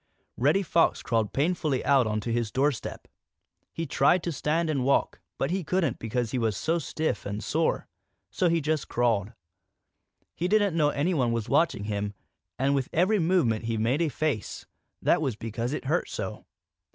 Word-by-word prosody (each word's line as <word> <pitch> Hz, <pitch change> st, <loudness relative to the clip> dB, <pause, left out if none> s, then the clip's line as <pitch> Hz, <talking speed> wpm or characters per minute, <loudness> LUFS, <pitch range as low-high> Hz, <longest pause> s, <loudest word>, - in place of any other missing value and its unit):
Reddy 150 Hz, +10 st, +2 dB
Fox 170 Hz, -1 st, +2 dB
crawled 110 Hz, -3 st, 0 dB
painfully 150 Hz, -2 st, 0 dB
out 135 Hz, -4 st, +4 dB
onto 110 Hz, +2 st, -2 dB
his 115 Hz, -2 st, -1 dB
doorstep. 140 Hz, -1 st, -1 dB, 0.6 s
He 165 Hz, -, -4 dB
tried 175 Hz, +2 st, +3 dB
to 170 Hz, -, -2 dB
stand 160 Hz, +3 st, 0 dB
and 145 Hz, -5 st, 0 dB
walk, 140 Hz, +2 st, +1 dB, 0.2 s
but 135 Hz, -, -1 dB
he 190 Hz, 0 st, -1 dB
couldn't 165 Hz, -4 st, 0 dB
because 115 Hz, 0 st, -2 dB
he 130 Hz, -, -1 dB
was 110 Hz, -4 st, 0 dB
too 165 Hz, +2 st, +1 dB
stiff 155 Hz, +1 st, -2 dB
and 100 Hz, +1 st, -4 dB
sore. -, -, 0 dB, 0.4 s
So 180 Hz, -, +2 dB
he 165 Hz, -1 st, +2 dB
just 155 Hz, -1 st, -1 dB
crawled. 115 Hz, -3 st, +1 dB, 1.0 s
He 175 Hz, -, -2 dB
didn't 205 Hz, -3 st, +2 dB
know 150 Hz, -3 st, +3 dB
that -, -, -5 dB
anyone 140 Hz, -6 st, +1 dB
was 115 Hz, -2 st, -2 dB
watching 160 Hz, -11 st, +2 dB
him, 105 Hz, -1 st, -3 dB, 0.4 s
and 135 Hz, +2 st, +2 dB
with 135 Hz, -2 st, 0 dB
every 190 Hz, +6 st, +3 dB
movement 160 Hz, -, +2 dB
he 115 Hz, 0 st, -1 dB
made 120 Hz, +8 st, +1 dB
a 165 Hz, -, +2 dB
face. 145 Hz, -7 st, -2 dB, 0.4 s
That -, -, +3 dB
was 135 Hz, -7 st, -1 dB
because 115 Hz, +3 st, -4 dB
it 150 Hz, -, -4 dB
hurt 160 Hz, +6 st, 0 dB
so. -, -, -5 dB
140 Hz, 175 wpm, -27 LUFS, 115-165 Hz, 1.0 s, out